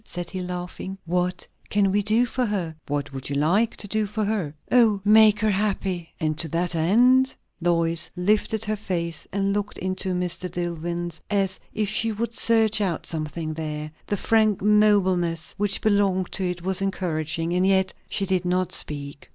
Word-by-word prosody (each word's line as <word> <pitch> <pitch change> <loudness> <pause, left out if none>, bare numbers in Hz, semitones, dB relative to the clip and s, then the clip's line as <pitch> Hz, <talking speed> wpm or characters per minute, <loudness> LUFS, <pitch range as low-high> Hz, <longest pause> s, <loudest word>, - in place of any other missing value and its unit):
said 175 -4 -6
he, 185 -1 -4
laughing. 180 +1 -5
"What 180 +1 -1 0.2
can 200 -2 +2
we 205 +2 +2
do 215 +4 +3
for 250 +1 -2
her?" 180 -6 -2
"What 145 0 -3
would 135 0 -6
you 140 - -2
like 180 +11 +2
to 205 - -4
do 215 +1 0
for 210 +1 -2
her?" 195 -9 -2 0.2
"Oh 225 -5 +5
Make 215 0 +7
her 215 -1 +3
happy!" 190 -4 -1
"And 155 -1 0
to 165 - +1
that 170 +3 -1
end 245 +11 +4
?" - - -44
Lois 170 -1 +1
lifted 210 +4 +1
her 215 0 0
face 170 -5 -3
and 195 0 0
looked 205 0 -3
into 185 0 -2
Mr. 180 0 -2
Dillwyn's 175 -1 -4
as 195 -2 0 0.2
if 215 -1 0
she 220 +2 +1
would 230 +2 -3
search 225 -2 +3
out 185 -5 -1
something 155 0 -4
there. 155 -1 -5 0.2
The 205 - -1
frank 215 -2 +2
nobleness 190 -6 +3
which 205 -1 -1
belonged 200 -3 +2
to 190 - -1
it 175 -1 -5
was 190 +1 0
encouraging, 165 -3 -1
and 180 +1 +2
yet 190 -1 +2 0.2
she 195 - -1
did 185 -2 0
not 180 0 0
speak. 140 -1 -5
185 Hz, 180 wpm, -24 LUFS, 170-210 Hz, 0.2 s, Make